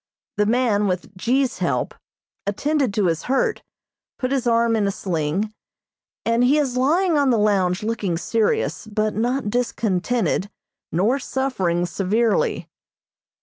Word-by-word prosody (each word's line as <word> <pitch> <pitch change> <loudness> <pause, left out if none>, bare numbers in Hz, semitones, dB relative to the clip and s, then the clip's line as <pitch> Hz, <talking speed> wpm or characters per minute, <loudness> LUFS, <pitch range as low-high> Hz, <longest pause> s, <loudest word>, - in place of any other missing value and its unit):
The 210 0 +2
man, 220 -3 +2
with 185 +2 -3
G.'s 255 +6 0
help, - - -1 0.5
attended 280 +4 0
to 210 - +2
his 165 -2 +1
hurt, 430 - +1 0.6
put 255 -1 -2
his 260 -3 0
arm 230 0 +3
in 210 -2 +1
a - - +1
sling, 185 +2 -2 0.7
and 230 +1 +2
he 270 +4 +4
is 275 -4 0
lying 315 +5 +2
on 280 -2 +3
the 240 - +3
lounge 195 -3 +2
looking 210 -6 -1
serious, 220 +4 0
but 215 0 -1
not 240 0 -1
discontented 220 -4 0 0.4
nor 215 +11 +2
suffering 195 -11 -1
severely. 205 +5 0
225 Hz, 135 wpm, -22 LUFS, 195-255 Hz, 0.7 s, he